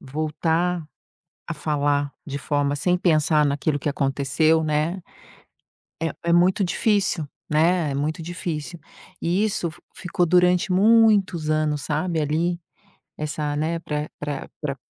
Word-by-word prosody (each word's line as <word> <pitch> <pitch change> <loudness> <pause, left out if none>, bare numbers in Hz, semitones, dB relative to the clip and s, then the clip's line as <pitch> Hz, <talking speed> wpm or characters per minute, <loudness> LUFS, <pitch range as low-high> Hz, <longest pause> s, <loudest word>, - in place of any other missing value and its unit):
voltar 160 +4 -1 0.7
a 170 - -3
falar 145 -2 0
de 140 -2 -4
forma 145 0 0
sem 180 +5 +1
pensar 155 -3 +3
naquilo 145 +1 0
que 145 - -3
aconteceu, 145 +3 +1
né, 155 +5 0 1.0
eh, 165 - 0
é 170 - +2
muito 185 +4 +4
difícil, 195 -3 +1 0.2
né, 160 +1 +2
é - - -4
muito 150 +4 -2
difícil. 170 -1 -5 0.4
E 180 +5 +1
isso 195 -5 -1
f 175 +2 -17
ficou 180 -1 -1
durante 180 +2 +3
muitos 200 -5 +4
anos, 155 -2 0
sabe, 160 +3 -1
ali, 165 +4 0 0.6
essa, 150 -1 -3
né, 160 +3 -1
pra 150 -2 -4
pra 145 -2 -5
pra 140 -3 -2
155 Hz, 135 wpm, -23 LUFS, 150-175 Hz, 1.0 s, muito